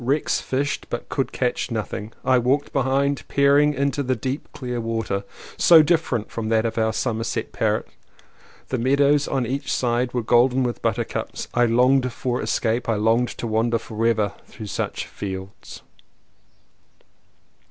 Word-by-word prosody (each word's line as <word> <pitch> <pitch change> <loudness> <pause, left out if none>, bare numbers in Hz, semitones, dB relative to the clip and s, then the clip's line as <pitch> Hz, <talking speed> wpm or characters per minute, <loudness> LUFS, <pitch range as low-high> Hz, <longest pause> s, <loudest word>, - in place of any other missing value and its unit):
Rex 140 +5 +1
fished, 140 +2 -2
but - - -5
could - - -1
catch - - -1
nothing. 105 +1 -4
I 130 -1 +4
walked 135 +4 0
behind, 135 +1 +1
peering 145 +1 +4
into 140 +1 0
the 130 -1 0
deep 130 +5 -4
clear 125 -3 -4
water, 115 -3 -2 0.3
so 165 -2 +7
different 150 -9 0
from 110 -1 -3
that 110 0 +2
of 115 0 -1
our 110 0 +2
Somersetshire 115 -1 -2
Parret. - - 0 0.8
The 130 - -1
meadows 140 +3 +3
on 135 -3 0
each 135 +3 -3
side 120 0 0
were 120 - 0
golden 125 +3 +3
with 120 -3 -3
buttercups. - - -3
I 120 0 +3
longed 125 +2 +3
for 125 +1 -2
escape, 115 +2 -1
I 115 - +2
longed 115 +3 +2
to - - -4
wander 115 +1 +1
forever 110 -2 0
through 110 - -9
such - - -3
fields! 95 -1 -8
125 Hz, 150 wpm, -23 LUFS, 115-135 Hz, 0.8 s, so